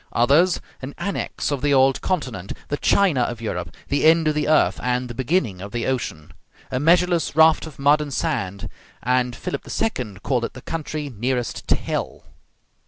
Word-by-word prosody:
Others, 145 +10 +4 0.2
an 135 +2 -7
annex 195 -4 -3
of 140 -3 -2
the 145 -1 +3
old 135 0 +4
continent, 125 - -3 0.2
the 145 - -1
China 180 -9 +3
of 120 -1 -2
Europe, 90 -7 -4
the 140 - +1
end 160 0 +5
of 155 - +3
the 150 0 -1
earth 155 0 +3
and 125 0 -1
the 120 - -7
beginning 130 - -1
of 100 +1 -7
the 120 0 -2
ocean, 120 -12 -3 0.4
a 125 - 0
measureless 170 +1 +3
raft 160 0 +5
of 155 - -12
mud 145 +2 +4
and 145 -1 -5
sand; 100 -4 -2 0.4
and 125 -1 +1
Philip 140 - -5
II. 110 - -2
called 125 -3 0
it - - -3
the 125 - -10
country 155 -3 -4
nearest 125 +2 -2
to - - +4
hell. - - -4
135 Hz, 180 wpm, -22 LUFS, 120-155 Hz, 0.4 s, end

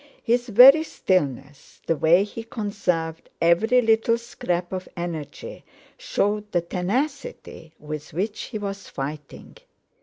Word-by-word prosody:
His 240 +1 0
very 255 +8 +9
stillness, 145 - -2
the 165 - +1
way 165 +5 +4
he 210 +2 -7
conserved 180 -8 -3
every 220 +9 +3
little 225 +1 +3
scrap 180 -6 -4
of 185 0 -5
energy, 170 -4 -6 0.3
showed 210 +1 -2
the 175 - +1
tenacity 195 - -4
with 150 +1 -7
which 200 +7 -3
he 220 - -6
was 200 -1 -6
fighting. 150 - -7
190 Hz, 120 wpm, -24 LUFS, 165-225 Hz, 0.3 s, very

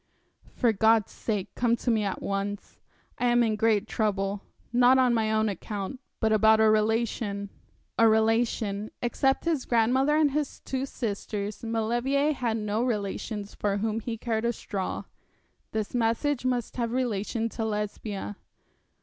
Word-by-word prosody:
'For 235 -3 +3
God's 220 0 +3
sake 205 -3 -3
come 235 -1 +2
to 240 +1 -1
me 220 -2 +2
at 195 -2 -3
once. 200 +1 -4 0.4
I 245 - +2
am 240 0 +4
in 220 -2 +1
great 215 -1 +2
trouble; 200 -3 -1 0.3
not 250 +2 +6
on 255 -2 +4
my 220 -2 +1
own 220 0 +2
account, 205 +4 -4 0.2
but 220 -1 +2
about 220 0 +5
a 220 - +5
relation.' 215 -2 0 0.5
A 230 - +7
relation 220 -2 +1
except 270 +4 +1
his 320 -6 +1
grandmother 255 +6 +3
and 305 -2 +4
his 295 0 -2
two 265 0 -3
sisters 210 -3 -4
Maulevrier 240 +6 +1
had 235 -5 -1
no 210 +1 -1
relations 210 -2 -3
for 200 -1 -1
whom 220 +1 -1
he 230 +1 -4
cared 220 -1 -2
a 235 0 +1
straw. 195 -4 -4 0.7
This 215 -2 -3
message 245 +3 0
must 250 -1 -1
have 235 -1 -1
relation 230 -2 -1
to 225 - -4
Lesbia. 210 -1 -3
225 Hz, 150 wpm, -27 LUFS, 210-240 Hz, 0.7 s, A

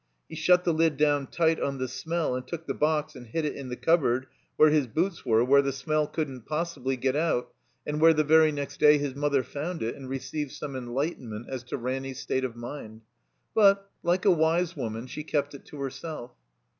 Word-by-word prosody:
He - - -13
shut 180 +3 +4
the 170 - +2
Kd 160 -2 +2
down 145 -2 +2
tight 165 -1 +1
on 140 -1 -2
the 130 0 -2
smell 160 +3 -2
and 125 0 -4
took 165 -1 -6
the - - -2
box 150 -1 0
and 125 -2 -10
hid 155 +8 -2
it 150 - -2
in 135 -2 -7
the 125 - -3
cupboard 130 -5 +2 0.3
where 155 0 +7
his 150 -4 +2
boots 170 - -1
were, 115 -2 +3
where 140 +2 +6
the 140 0 -1
smell 150 +3 0
couldn't 135 -7 -4
possibly 150 -5 -2
get 130 +2 0
out, 155 -5 0 0.3
and 150 +1 -2
where 165 0 +8
the 155 - +3
very 155 +1 +5
next 145 -1 -5
day 150 0 +7
his 145 -2 -2
mother 140 -1 +1
found 160 +5 -4
it 115 - -2
and 130 -2 -9
received 135 +2 -4
some 145 -3 -6
enlighten 130 +1 -3
ment 110 +2 -6
as 130 -2 -4
to 125 - -4
Ranny's 130 +1 -4
state 130 - -1
of 125 -3 -3
mind. 120 -2 -8 0.5
But, 200 -2 +4
like 175 +2 +1
a 200 - +7
wise 170 +1 +2
woman, 115 -4 -4
she 150 +4 -6
kept 145 -2 -1
it 140 - -11
to 150 - -11
herself. 140 -1 -6
145 Hz, 220 wpm, -27 LUFS, 130-160 Hz, 0.5 s, where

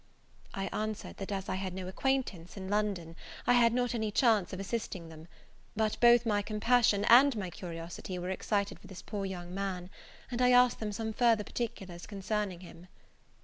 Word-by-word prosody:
I 195 - -2
answered, 215 0 -4
that 195 +1 -6
as 195 -1 -3
I - - -1
had 190 -1 -3
no 185 -1 -5
acquaintance 205 -5 -2
in 190 -1 -6
London, 200 -6 -1 0.3
I - - +4
had 235 -1 +5
not 245 +1 0
any 220 -2 -1
chance 215 -3 +3
of 185 - -5
assisting 195 -5 -4
them: 160 0 -12 0.5
but 215 0 0
both 240 0 +6
my 205 -2 +2
compassion 215 -1 +2
and 260 +3 +7
my 190 -4 -4
curiosity 170 +1 -6
were 180 +1 -3
excited 200 +1 -1
for - - -15
this 190 -2 -10
poor 200 -2 -4
young 175 -2 -7
man; 190 -2 -4 0.4
and 245 0 -2
I 250 0 +5
asked 250 0 +5
them 215 -1 -3
some 220 +1 -3
further 230 -2 +3
particulars 195 -7 -5
concerning 200 -2 -3
him. 175 0 -13
205 Hz, 185 wpm, -31 LUFS, 185-230 Hz, 0.5 s, and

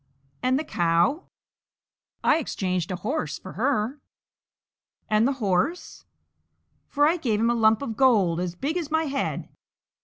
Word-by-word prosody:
"And 255 +1 +2
the 305 - -2
cow?" 175 - +1 1.0
"I - - +4
exchanged 185 - -2
a 185 - -2
horse 160 -3 -3
for 185 - -10
her." 255 +2 -1 1.1
"And 215 +3 +4
the 275 - +1
horse?" 225 - -2 0.8
"For 290 0 +2
him 310 - +5
I - - -3
gave 230 -10 0
a 230 +2 +2
lump 225 +1 +3
of 230 -5 -4
gold 205 -11 +3
as 180 -1 -3
big 290 - -2
as 330 -5 -3
my 320 +1 +1
head." 275 -3 -3
230 Hz, 150 wpm, -25 LUFS, 185-285 Hz, 1.1 s, him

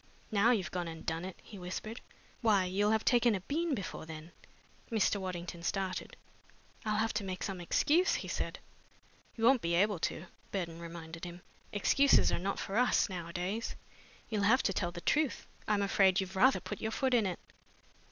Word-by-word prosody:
"Now 215 +2 +4
you've 195 -10 +1
gone 175 -2 -2
and 160 -1 -8
done 165 +2 -2
it!" 190 - -8
he 205 - -11
whispered. 200 +6 -5 0.4
"Why, 210 -5 +4
you'll 200 +3 +1
have 220 0 +1
taken 240 -2 +4
a 190 - -3
bean 310 - -1
before 185 -6 -6
then!" 160 +1 -9 0.6
Mr. 215 -2 +2
Waddington 175 -3 -5
started. 190 +1 -3 0.7
"I'll 215 -1 0
have 225 +1 +1
to 210 -1 -1
make 185 -1 -4
some 190 -3 -3
excuse," 315 - +3
he - - -4
said. - - -3 0.8
"You 225 - -5
won't 255 +1 +6
be 170 0 0
able 200 +1 +3
to," 160 - -2 0.3
Burton 170 -4 -3
reminded 165 -1 -8
him. 175 0 -7 0.3
"Excuses 275 +6 +4
are - - 0
not 195 +2 -2
for 195 - -3
us, 250 -3 +3
nowadays. 180 +4 -3 0.5
You'll 215 -2 -1
have 230 +6 +4
to 195 - +1
tell 175 -1 -1
the 175 0 -8
truth. 300 - +1 0.2
I'm 210 -1 +2
afraid 195 -1 +4
you've 190 0 -3
rather 260 +8 +5
put - - -6
your 220 - -1
foot 260 +3 0
in 225 -5 +4
it." 180 - -3
195 Hz, 185 wpm, -33 LUFS, 175-225 Hz, 0.8 s, won't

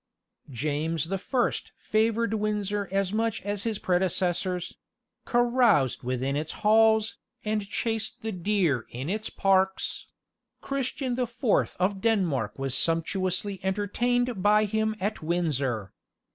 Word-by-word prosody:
James 150 +4 -1
the 195 0 -1
First 245 +5 -1
favoured 225 0 +1
Windsor 210 -1 -1
as 195 0 0
much 225 0 0
as 205 +1 -3
his 225 -2 -1
predecessors; 180 0 0 0.5
caroused 240 - +3
within 130 +2 -1
its 150 +2 -2
halls, 220 0 +4 0.3
and 210 -1 -1
chased 225 +2 -2
the 220 - -2
deer 180 - 0
in 130 +8 -4
its 215 +1 -2
parks; 190 0 +1 0.5
Christian 270 -1 -2
the 250 0 0
Fourth 235 -1 0
of 190 +1 0
Denmark 160 - +1
was 135 -1 -1
sumptuously 185 +5 +1
entertained 220 +4 0
by 210 +2 +4
him 220 +1 0
at 205 +3 -2
Windsor. 140 - -1
200 Hz, 120 wpm, -27 LUFS, 170-220 Hz, 0.5 s, halls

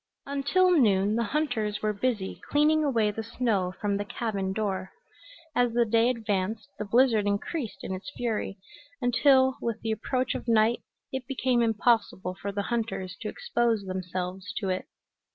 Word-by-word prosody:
Until 280 +7 +2
noon 210 - +4
the 235 0 +1
hunters 230 -9 -1
were 215 0 +1
busy 210 -2 -2
cleaning 305 +1 +4
away 230 -7 +2
the 225 - -4
snow 220 -5 0
from 205 -1 0
the 205 - -2
cabin 200 -3 -2
door. 190 -2 -2 0.7
As 245 -2 +2
the 240 0 +3
day 230 +2 +3
advanced 215 -2 -2
the 210 - -2
blizzard 225 -1 +3
increased 215 +5 -2
in - - -3
its 190 +9 -6
fury, 220 -4 -2 0.4
until, 260 +1 +4
with 230 -1 -2
the 225 - -1
approach 255 +4 -1
of - - -6
night, 225 +1 +3 0.3
it 265 -2 -4
became 255 -3 +1
impossible 225 -5 +1
for 200 - -2
the 200 0 -2
hunters 220 -5 -2
to - - -3
expose 240 - 0
themselves 185 0 -4
to 195 -3 -1
it. 185 0 -2
225 Hz, 160 wpm, -28 LUFS, 200-250 Hz, 0.7 s, noon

